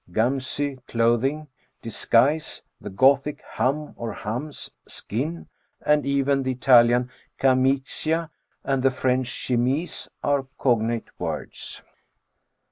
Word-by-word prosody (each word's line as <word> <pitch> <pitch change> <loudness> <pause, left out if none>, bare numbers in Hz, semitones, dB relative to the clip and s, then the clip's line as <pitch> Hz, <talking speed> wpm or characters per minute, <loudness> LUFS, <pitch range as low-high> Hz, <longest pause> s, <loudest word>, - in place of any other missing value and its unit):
gamCy 130 +4 -1
clothing, 120 +6 +1 0.4
disguise; 125 +6 +1 0.2
the - - -6
Gothic 135 +8 +3
ham 150 +4 -1
or 115 -2 -5
hams, 125 +8 -5 0.2
skin; 150 +10 -4 0.4
and 150 -1 +3
even 140 0 +2
the 130 -1 -1
Italian 125 -1 +5 0.3
camicia, 135 +5 +1 0.3
and 135 -2 0
the 135 - +4
French 130 0 0
chemise, 130 +7 -1
are 140 -2 +1
cognate 115 -2 +1
words. - - -5
130 Hz, 100 wpm, -24 LUFS, 120-140 Hz, 0.4 s, Italian